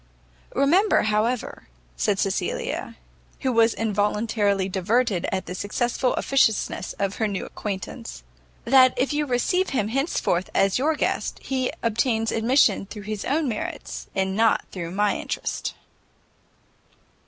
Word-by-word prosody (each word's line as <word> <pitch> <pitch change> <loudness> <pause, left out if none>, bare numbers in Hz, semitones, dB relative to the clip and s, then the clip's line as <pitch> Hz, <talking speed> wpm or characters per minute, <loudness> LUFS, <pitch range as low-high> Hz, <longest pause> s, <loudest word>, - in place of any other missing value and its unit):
"Remember, 340 - +4
however," 215 +3 -1 0.3
said - - +1
Cecilia, - - -2 0.5
who 260 - 0
was 230 0 +4
involuntarily 210 -2 0
diverted 195 +1 +1
at 190 0 -2
the - - -6
successful 240 +6 -1
officiousness 225 -8 +1
of 195 0 -2
her 220 - +1
new 200 -2 -3
acquaintance, 190 - -6 0.4
"that 255 0 +6
if 265 +4 +1
you 295 0 0
receive 360 +10 +1
him 215 -6 0
henceforth 245 - 0
as 195 +3 +3
your 310 +4 +2
guest, - - -1
he 260 -2 -1
obtains 230 0 +1
admission 225 -3 +3
through 210 0 -8
his 210 0 -4
own 300 +2 +1
merits, 220 -4 -5
and 190 0 0
not 225 +1 +3
through 170 -3 -5
my 205 +3 +1
interest." - - -4
220 Hz, 130 wpm, -24 LUFS, 200-255 Hz, 0.5 s, that